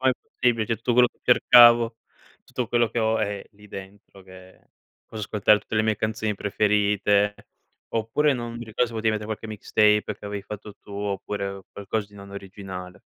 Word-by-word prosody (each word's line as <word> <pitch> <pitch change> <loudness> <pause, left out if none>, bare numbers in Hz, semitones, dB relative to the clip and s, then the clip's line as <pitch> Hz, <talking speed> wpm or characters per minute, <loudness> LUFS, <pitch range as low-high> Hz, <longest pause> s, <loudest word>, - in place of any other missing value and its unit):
Qua 130 - +3
è - - +5
possibile, 115 -3 0
cioè, 115 - -1
tutto 120 - -1
quello 125 0 +5
che - - -40
cercavo, 120 -1 +6 0.5
tutto 125 -3 -4
quello 120 -1 +2
che 120 - -3
ho 110 0 +1
è 100 -2 -2
lì 105 0 -18
dentro, 95 0 -11
che 95 0 -16 0.4
posso 110 -1 -7
ascoltare 105 +1 +3
tutte 105 - -8
le 110 - +3
mie 110 -1 +1
canzoni 110 0 -2
preferite 105 0 +1 0.6
oppure, 115 +7 +1
non 120 -2 -4
mi 120 - -7
ricordo, 110 +2 0
se - - -10
potevi 110 0 0
mettere 105 -1 -3
qualche 110 0 -5
mixtape 105 0 +2
che - - -14
avevi 100 -1 -5
fatto 105 0 -9
tu, 100 - -14
oppure 100 -1 -4
qualcosa 100 +1 -3
di 105 - -20
non 100 0 -11
originale. 95 -2 -9
105 Hz, 185 wpm, -24 LUFS, 100-115 Hz, 0.6 s, cercavo